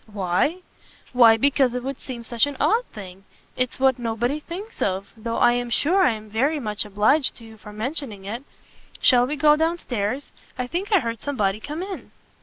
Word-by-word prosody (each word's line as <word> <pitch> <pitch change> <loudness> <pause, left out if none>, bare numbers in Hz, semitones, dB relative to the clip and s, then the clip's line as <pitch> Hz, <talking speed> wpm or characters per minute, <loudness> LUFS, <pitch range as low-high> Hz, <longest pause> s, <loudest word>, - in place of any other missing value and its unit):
"Why? 200 - 0 0.5
why 230 -3 +7
because 265 0 +2
it 250 - -3
would 270 0 -5
seem 245 -3 -7
such 235 +3 +1
an 285 -2 -6
odd 465 +4 +2
thing 195 -2 -10 0.3
it's 255 0 -2
what 265 -1 +3
nobody 240 +5 -1
thinks 380 +9 -9
of 190 0 -2
though 230 +1 -4
I 240 0 +5
am 245 0 -2
sure 335 - +3
I 355 - +4
am 215 0 -9
very 270 +9 0
much 210 -4 -1
obliged 210 +8 +2
to 230 - -13
you 225 -1 -12
for 210 -1 -12
mentioning 220 -2 -4
it. 225 +5 -5 0.6
Shall 245 -1 +5
we 295 - -2
go 300 0 +5
down 325 +2 0
stairs? 245 -1 -3 0.3
I 250 - -2
think 355 - -4
I 400 - +5
heard 230 -2 -4
somebody 210 -8 -1
come 300 +9 -5
in. 385 -1 -7
245 Hz, 200 wpm, -23 LUFS, 220-290 Hz, 0.6 s, why